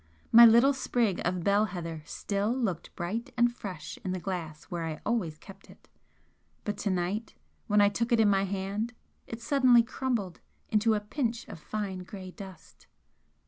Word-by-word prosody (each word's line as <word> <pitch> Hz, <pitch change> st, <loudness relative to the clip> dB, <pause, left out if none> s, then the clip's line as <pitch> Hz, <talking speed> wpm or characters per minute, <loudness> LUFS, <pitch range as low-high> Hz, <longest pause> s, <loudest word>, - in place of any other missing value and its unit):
My 235 Hz, +1 st, +10 dB
little 235 Hz, +5 st, +6 dB
sprig 235 Hz, -7 st, 0 dB
of 175 Hz, 0 st, -1 dB
bell 200 Hz, +3 st, +3 dB
heather 165 Hz, -6 st, -6 dB
still 200 Hz, +5 st, -2 dB
looked 225 Hz, -10 st, -2 dB
bright 205 Hz, +8 st, -4 dB
and 240 Hz, 0 st, +3 dB
fresh 170 Hz, -9 st, -7 dB
in 185 Hz, -2 st, -2 dB
the 185 Hz, -, -3 dB
glass 170 Hz, -5 st, -5 dB
where 170 Hz, -1 st, -5 dB
I 160 Hz, -1 st, -4 dB
always 195 Hz, -9 st, -1 dB
kept 195 Hz, +4 st, -14 dB
it -, -, -18 dB, 0.8 s
but 210 Hz, -, -2 dB
to 205 Hz, -, -1 dB
night 190 Hz, +4 st, -2 dB, 0.3 s
when 210 Hz, -1 st, +4 dB
I 205 Hz, -, +6 dB
took 230 Hz, +4 st, -2 dB
it 235 Hz, -, +4 dB
in 220 Hz, -, +5 dB
my 195 Hz, -1 st, +3 dB
hand 200 Hz, +4 st, -3 dB, 0.3 s
it 230 Hz, 0 st, -7 dB
suddenly 250 Hz, -2 st, +5 dB
crumbled 235 Hz, -7 st, -3 dB, 0.3 s
into 220 Hz, +1 st, +3 dB
a -, -, +1 dB
pinch 230 Hz, +1 st, -3 dB
of 200 Hz, -7 st, -9 dB
fine 200 Hz, +1 st, -4 dB
grey 185 Hz, 0 st, -8 dB
dust. 185 Hz, -5 st, -12 dB
205 Hz, 175 wpm, -29 LUFS, 185-230 Hz, 0.8 s, My